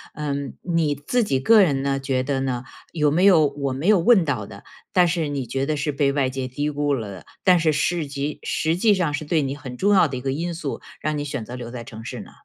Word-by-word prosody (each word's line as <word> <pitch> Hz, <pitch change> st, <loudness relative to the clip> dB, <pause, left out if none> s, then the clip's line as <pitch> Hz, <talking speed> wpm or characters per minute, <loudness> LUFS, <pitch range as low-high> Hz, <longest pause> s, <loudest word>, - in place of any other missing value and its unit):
嗯， 140 Hz, -2 st, -3 dB
你 165 Hz, -4 st, +1 dB
自 190 Hz, -, 0 dB
己 135 Hz, -11 st, 0 dB
个 215 Hz, +11 st, +6 dB
人 140 Hz, -8 st, +2 dB
呢 140 Hz, 0 st, 0 dB
觉 135 Hz, -1 st, -1 dB
得 135 Hz, 0 st, -1 dB
呢， 130 Hz, -2 st, -2 dB, 0.3 s
有 150 Hz, -3 st, +1 dB
没 170 Hz, +5 st, +2 dB
有 180 Hz, -6 st, +6 dB
我 140 Hz, -1 st, -3 dB
没 140 Hz, +7 st, -3 dB
有 210 Hz, -3 st, +6 dB
问 195 Hz, -1 st, +5 dB
到 125 Hz, -9 st, -2 dB
的， 100 Hz, -2 st, -12 dB, 0.3 s
但 180 Hz, -1 st, +4 dB
是 170 Hz, -2 st, 0 dB
你 140 Hz, -3 st, -3 dB
觉 135 Hz, +3 st, -2 dB
得 155 Hz, -1 st, 0 dB
是 145 Hz, +1 st, -1 dB
被 140 Hz, -1 st, +1 dB
外 140 Hz, -2 st, +1 dB
界 130 Hz, -1 st, -3 dB
低 145 Hz, +4 st, -2 dB
估 145 Hz, -1 st, 0 dB
了 110 Hz, -5 st, -5 dB
的， 95 Hz, -, -11 dB, 0.2 s
但 180 Hz, -2 st, +5 dB
是 160 Hz, -1 st, +2 dB
市 160 Hz, +1 st, 0 dB
级 140 Hz, +1 st, -4 dB
实 160 Hz, +1 st, 0 dB
际 205 Hz, +3 st, +3 dB
上 170 Hz, -6 st, 0 dB
是 150 Hz, -, -3 dB
对 155 Hz, 0 st, +1 dB
你 135 Hz, 0 st, -3 dB
很 130 Hz, -4 st, -9 dB
重 205 Hz, +6 st, +3 dB
要 185 Hz, -4 st, +5 dB
的 130 Hz, -2 st, -5 dB
一 -, -, -6 dB
个 135 Hz, +1 st, -2 dB
因 165 Hz, +5 st, -2 dB
素， 150 Hz, -4 st, -5 dB, 0.2 s
让 155 Hz, 0 st, -2 dB
你 145 Hz, -, -2 dB
选 140 Hz, -6 st, -4 dB
择 120 Hz, -, -8 dB
留 120 Hz, -2 st, -7 dB
在 120 Hz, -1 st, -7 dB
城 115 Hz, -1 st, -10 dB
市 120 Hz, -1 st, -6 dB
呢？ -, -, -13 dB
145 Hz, 285 characters per minute, -23 LUFS, 135-165 Hz, 0.3 s, 个